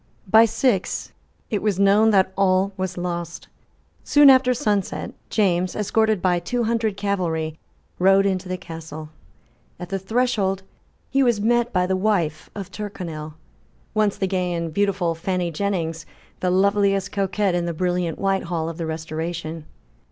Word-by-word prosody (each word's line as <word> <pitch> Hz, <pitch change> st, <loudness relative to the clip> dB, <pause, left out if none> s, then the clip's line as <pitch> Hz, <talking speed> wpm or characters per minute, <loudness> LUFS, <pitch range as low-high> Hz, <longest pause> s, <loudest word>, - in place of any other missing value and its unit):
By 220 Hz, +4 st, +7 dB
six 225 Hz, -3 st, 0 dB, 0.4 s
it 210 Hz, -, 0 dB
was 205 Hz, -3 st, 0 dB
known 200 Hz, +3 st, +5 dB
that 190 Hz, -3 st, +3 dB
all 195 Hz, 0 st, +2 dB
was 185 Hz, -1 st, -4 dB
lost. 175 Hz, -1 st, -4 dB, 0.6 s
Soon 290 Hz, -1 st, +7 dB
after 260 Hz, -1 st, +4 dB
sunset, 205 Hz, -5 st, -1 dB, 0.2 s
James, 185 Hz, -4 st, +1 dB
escorted 215 Hz, -1 st, +1 dB
by 180 Hz, -2 st, +3 dB
two 245 Hz, +7 st, -2 dB
hundred 225 Hz, -3 st, 0 dB
cavalry, 165 Hz, -6 st, -2 dB, 0.4 s
rode 195 Hz, +2 st, +5 dB
into 190 Hz, -1 st, -1 dB
the 185 Hz, -, -2 dB
Castle. 160 Hz, -3 st, -8 dB, 0.7 s
At 180 Hz, -, -7 dB
the 195 Hz, 0 st, -2 dB
threshold 195 Hz, -2 st, 0 dB, 0.5 s
he 275 Hz, -, +3 dB
was 240 Hz, -5 st, +3 dB
met 240 Hz, +3 st, +2 dB
by 180 Hz, -1 st, +2 dB
the 190 Hz, +1 st, 0 dB
wife 185 Hz, -7 st, 0 dB
of 200 Hz, -2 st, -7 dB
Tyrconnel, 170 Hz, -8 st, -6 dB, 0.6 s
once 215 Hz, -2 st, +1 dB
the 195 Hz, -, 0 dB
gay 180 Hz, -2 st, -1 dB
and 170 Hz, -2 st, -3 dB
beautiful 195 Hz, -3 st, +1 dB
Fanny 175 Hz, +1 st, -2 dB
Jennings, 165 Hz, -2 st, -2 dB, 0.3 s
the 185 Hz, -, 0 dB
loveliest 195 Hz, +1 st, +2 dB
coquette 195 Hz, -1 st, 0 dB
in 175 Hz, -1 st, 0 dB
the -, -, -1 dB
brilliant 175 Hz, 0 st, -1 dB
Whitehall 175 Hz, -4 st, -1 dB
of 165 Hz, +1 st, -8 dB
the 165 Hz, -, -2 dB
Restoration. 160 Hz, 0 st, -5 dB
190 Hz, 150 wpm, -23 LUFS, 175-205 Hz, 0.7 s, By